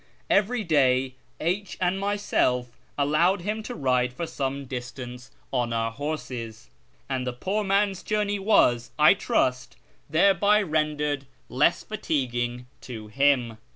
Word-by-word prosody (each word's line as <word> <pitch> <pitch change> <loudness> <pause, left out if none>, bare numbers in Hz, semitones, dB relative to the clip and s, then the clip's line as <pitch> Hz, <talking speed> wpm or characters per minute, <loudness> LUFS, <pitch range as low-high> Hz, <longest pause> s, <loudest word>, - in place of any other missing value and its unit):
Every 215 +3 +2
day 135 -6 +2 0.3
H 185 +4 -2
and 185 +1 +1
myself 125 - 0 0.2
allowed 165 +7 +2
him 210 +4 -2
to 245 +3 -7
ride 125 -2 +1
for 170 - -4
some 140 -2 -3
distance 125 0 -7 0.2
on 120 -2 0
our 115 0 0
horses, 120 -5 -6 0.4
and 130 -2 -2
the 125 - -2
poor 195 +12 -2
man's 195 -1 +1
journey 205 -1 -1
was, 120 - +3
I 155 +2 +7
trust, 130 - 0 0.3
thereby 200 +6 +4
rendered 150 -4 -1 0.2
less 140 +7 +2
fatiguing 125 - -2 0.2
to 110 -4 -8
him. 125 -2 +2
145 Hz, 125 wpm, -26 LUFS, 125-195 Hz, 0.4 s, I